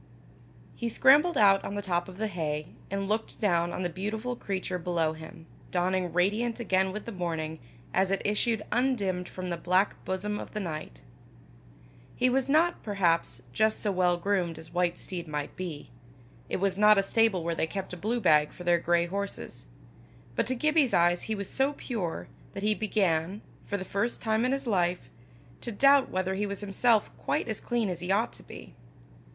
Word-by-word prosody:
He 235 - -2
scrambled 290 +9 +5
out 195 -2 +5
on 200 - -4
the 205 - -2
top 175 -1 -1
of 185 - -11
the 220 - -1
hay, 155 -6 -3 0.2
and 195 0 -2
looked 215 +2 -2
down 175 -4 +2
on 180 - -3
the - - +1
beautiful 215 +7 -3
creature 190 -4 -3
below 165 -2 0
him, 160 +1 -11 0.2
dawning 180 0 0
radiant 210 +8 +1
again 190 -4 +1
with 210 +2 -6
the 230 - -5
morning, 160 -4 -3 0.3
as 190 0 +2
it 195 0 +1
issued 210 +1 +1
undimmed 205 -8 0
from 185 -1 -5
the 170 - -2
black 185 +4 +1
bosom 210 +3 -2
of - - -9
the - - -1
night. 155 - -6 1.1
He 250 0 +2
was 265 +1 +1
not, 330 +4 +3
perhaps, 170 - 0
just 220 0 +2
so 210 - 0
well 180 -2 +2
groomed 175 -3 0
as 160 0 -11
white 175 -1 0
steed 175 -3 -5
might 150 -1 -4
be; 165 -8 -6 0.6
it - - -1
was 195 0 0
not 210 0 +7
a 195 - +4
stable 215 -4 +2
where 170 0 -1
they 160 - -1
kept 190 +1 -5
a - - -5
blue 220 +7 -1
bag 150 -7 +4
for 180 - -10
their 175 -1 +3
grey 170 0 +2
horses; 200 - -5 0.7
but - - 0
to 255 - -1
Gibbie's 305 0 +3
eyes 175 +1 +3
he 220 - -2
was 200 -2 -3
so 270 +2 +1
pure, 215 - -4 0.3
that 195 - -6
he 215 0 +3
began, 195 -3 0 0.2
for 205 - -1
the 190 - -5
first 205 +6 -1
time 220 +1 +1
in 255 - +1
his 275 0 -1
life, 180 -5 0 0.5
to 240 - -5
doubt 275 +5 +5
whether 185 0 -1
he 205 +2 -1
was 200 0 -4
himself 210 +2 +2
quite - - -1
as - - -3
clean 240 -3 0
as 180 -3 -3
he 180 +2 -3
ought 215 +4 +1
to - - -12
be. - - -12
195 Hz, 195 wpm, -28 LUFS, 175-220 Hz, 1.1 s, not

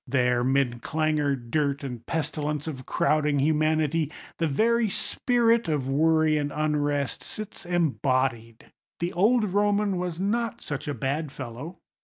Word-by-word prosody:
There, 125 -2 +2
'mid 130 -2 +1
clangour, 155 -2 +1
dirt, 140 +3 -1
and 125 -4 -6
pestilence 150 0 -2
of 135 -5 -6
crowding 150 -1 +2
humanity, 155 +1 +1 0.3
the 165 - +2
very 225 +9 +2
spirit 235 +2 +1
of 145 -5 -1
worry 155 +2 +3
and 145 0 -2
unrest 145 -2 0
sits 210 -3 -7
embodied. 130 -8 0 0.3
The 170 +1 -2
old 210 +1 +3
Roman 205 -1 +2
was 175 -2 -3
not 230 +4 -1
such 145 -1 -5
a 145 - -2
bad 140 +2 -2
fellow. 140 +8 -7
150 Hz, 135 wpm, -26 LUFS, 140-175 Hz, 0.3 s, worry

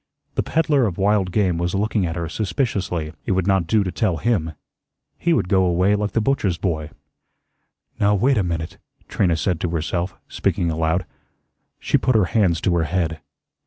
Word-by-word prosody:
The - - 0
peddler 150 -6 +2
of 90 - -4
wild 100 -1 +2
game 90 -4 +1
was 85 +2 -1
looking 105 -2 0
at 80 - -4
her 85 -1 -3
suspiciously. 95 - -2
It - - +2
would 95 -1 0
not 95 -4 +2
do 105 +2 +3
to 90 - -3
tell 95 -4 0
him. 85 -9 0 0.7
He 170 - +1
would 160 - +2
go 95 0 +3
away 90 +3 +2
like 105 0 -1
the - - +2
butcher's 105 -8 0
boy. 80 -4 -2 1.1
"Now, 105 0 +3
wait 125 +4 +2
a - - +2
minute," 85 -2 -4 0.3
Trina 85 -5 +1
said 80 +2 -1
to 90 - 0
herself, 85 +3 -2
speaking 85 -2 -1
aloud. 80 +3 0 0.7
She - - +1
put 130 - +1
her 105 -4 +4
hands 95 -7 +3
to 90 - +1
her 80 - +1
head. 80 -2 -1
95 Hz, 185 wpm, -22 LUFS, 85-105 Hz, 1.1 s, her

